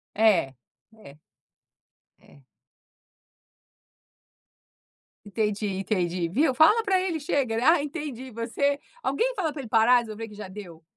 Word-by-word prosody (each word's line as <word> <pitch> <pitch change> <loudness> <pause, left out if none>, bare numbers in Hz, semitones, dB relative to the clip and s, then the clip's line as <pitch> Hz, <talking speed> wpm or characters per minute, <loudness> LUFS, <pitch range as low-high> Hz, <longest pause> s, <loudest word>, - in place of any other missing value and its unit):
É 200 -11 +3 0.4
é 145 -10 -15 1.0
é. 140 - -21 2.8
Entendi, 210 0 -2
entendi, 185 -3 -1
viu, 265 - +2
fala 320 - +5
para 390 -3 +2
ele 360 -3 -2
chega, 280 -5 -1
ele, 225 +2 -1
ah, 320 +1 +4
entendi 280 -4 -6
você 245 +5 -1 0.2
alguém - - 0
fala 325 -7 -2
para 285 - -6
ele 240 - -10
parar, 230 +3 +5
resolver 225 -1 -7
que 210 - -13
já 210 -1 -8
deu. 185 -4 -11
230 Hz, 125 wpm, -26 LUFS, 205-290 Hz, 2.8 s, fala